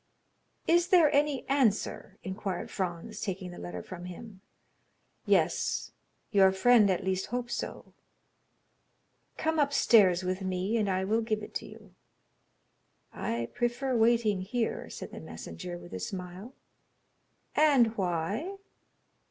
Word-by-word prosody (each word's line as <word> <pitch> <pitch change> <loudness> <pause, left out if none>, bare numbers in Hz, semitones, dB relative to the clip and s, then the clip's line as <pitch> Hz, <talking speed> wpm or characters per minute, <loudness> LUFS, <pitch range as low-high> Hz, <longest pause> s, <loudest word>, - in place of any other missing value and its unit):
"Is 345 +1 +4
there 350 -5 +5
any 285 -2 +1
answer?" 220 -7 0
inquired 190 -1 -4
Franz, 190 +3 -4
taking 190 -3 -4
the 175 - -10
letter 90 0 -6
from 175 -1 -8
him. 190 +2 -10 0.9
"Yes—your 195 -3 +1
friend 215 +1 +5
at 185 - 0
least 190 0 -1
hopes 245 0 -3
so." - - -5 1.4
"Come 320 0 0
upstairs 215 -10 +4
with 185 +1 -2
me, 185 +3 -1
and 210 -3 +1
I 190 0 0
will 220 +3 +1
give 215 -2 -2
it - - -9
to - - -4
you." 210 -3 -14 1.2
"I 115 0 -3
prefer 245 +2 -1
waiting 225 -4 +3
here," 225 +5 -2
said - - -8
the - - -8
messenger, 85 +1 -7
with 85 +1 -12
a 95 - -4
smile. 185 - -6 1.0
"And 270 -7 +4
why?" 195 - -2
205 Hz, 125 wpm, -30 LUFS, 185-240 Hz, 1.4 s, there